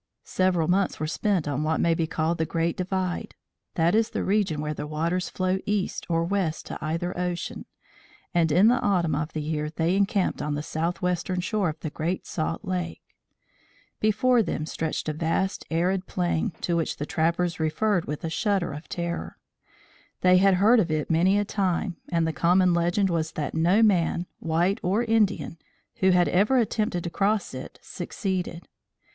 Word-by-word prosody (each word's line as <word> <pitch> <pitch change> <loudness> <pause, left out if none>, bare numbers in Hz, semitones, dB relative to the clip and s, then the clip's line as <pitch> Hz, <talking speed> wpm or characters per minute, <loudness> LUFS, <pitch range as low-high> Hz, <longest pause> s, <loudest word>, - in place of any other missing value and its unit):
Several 180 -4 +1
months 190 +2 +1
were 155 - -1
spent 175 +1 0
on 145 0 -1
what 155 +1 0
may 170 - +3
be 165 0 0
called 160 +1 -1
the 160 - +1
Great 165 0 0
Divide 185 -1 -3 0.4
that 170 +1 +3
is 220 +1 +3
the - - -3
region 195 -6 +1
where 150 0 -2
the 150 - -5
waters 165 +4 -1
flow 185 0 0
east 205 -2 -1
or 165 0 +2
west 175 -3 -1
to - - -6
either 165 +3 -2
ocean, 180 -1 -3 0.7
and 165 -2 +2
in 185 +8 +5
the 245 +2 +4
autumn 175 -6 +1
of 150 +2 -2
the 155 - -3
year 150 0 -2
they 165 +3 0
encamped 195 -1 +1
on 150 0 -2
the 145 - -3
southwestern 175 +3 -1
shore 195 0 0
of 155 0 -6
the 155 - -4
Great 170 +5 -3
Salt 165 +4 -3
Lake. 180 -2 -3 1.0
Before 230 +3 +3
them 160 -6 -2
stretched 160 0 -3
a 155 - 0
vast 165 +5 -1
arid 180 +3 0
plain 175 -3 0
to 170 - 0
which 165 -1 -1
the 150 - -3
trappers 170 +2 0
referred 175 +4 +1
with 150 0 -5
a 165 - -2
shudder 200 -2 0
of 150 +3 -9
terror. 170 -1 -4 0.8
They 180 0 +6
had 195 0 +5
heard 215 +6 +5
of 180 -6 +1
it 155 0 -1
many 180 +5 +4
a 205 - +1
time 190 -2 -1
and 165 -1 +1
the 160 - -1
common 180 +2 +3
legend 175 +3 +1
was 160 -1 -1
that 150 -3 -3
no 175 +7 +3
man 180 -4 +2
white 170 +4 +1
or 200 +6 +1
Indian 215 -7 +1 0.4
who 190 - +3
had 180 -1 +4
ever 210 +8 +3
attempted 215 -6 0
to 170 - -4
cross 205 +2 0
it, - - -8
succeeded. 180 -4 -4
175 Hz, 180 wpm, -26 LUFS, 160-195 Hz, 1.0 s, They